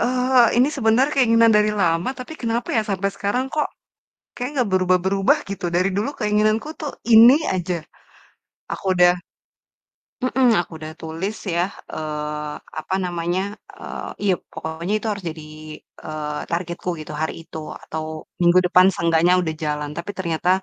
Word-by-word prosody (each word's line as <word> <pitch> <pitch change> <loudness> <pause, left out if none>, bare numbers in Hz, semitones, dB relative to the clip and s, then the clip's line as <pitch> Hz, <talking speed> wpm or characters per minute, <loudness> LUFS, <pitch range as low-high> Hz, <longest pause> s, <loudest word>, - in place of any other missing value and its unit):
eee, 250 -1 +3
ini 255 - +5
sebenarnya 255 +4 +3
keinginan 230 -3 +5
dari 210 0 +3
lama, 165 +6 +1
tapi 255 +5 -7
kenapa 235 +1 -1
ya 220 - +3
sampai 195 +1 0
sekarang 205 +6 0
kok 300 - +1 0.7
kayaknya 255 +4 -5
gak 200 - -5
berubah-berubah, 185 +1 +3
gitu? 195 -2 -5
Dari 185 +2 +3
dulu 215 +8 0
keinginanku 215 +4 +1
tuh 295 -2 -4 0.2
ini 230 +4 +9 0.2
aja. 180 0 -1 1.0
Aku - - -9
udah 180 0 +6 1.1
mhm, 255 0 +3
aku 175 0 -4
udah 155 0 -7
tulis 165 +6 -4 0.2
ya 170 - +2 0.3
eee, 150 -1 -4 0.3
apa 185 - -3
namanya, 175 +1 -1 0.4
eee, - - -7
iya 195 -2 +3 0.2
pokoknya 165 +5 -4
itu - - -4
harus 205 -2 -5
jadi, 155 -1 -8 0.6
eee, 150 -1 -4
targetku 170 +1 -3
gitu, 155 - -8
hari 160 - -1
itu, - - -9 0.3
atau 160 0 -5 0.4
minggu 175 +1 +5
depan 180 +1 +6
seenggaknya 170 +1 +3
udah 160 -3 -2
jalan, 150 -1 -2
tapi 170 +4 -4
ternyata 170 -1 -1
185 Hz, 150 wpm, -22 LUFS, 165-225 Hz, 1.1 s, ini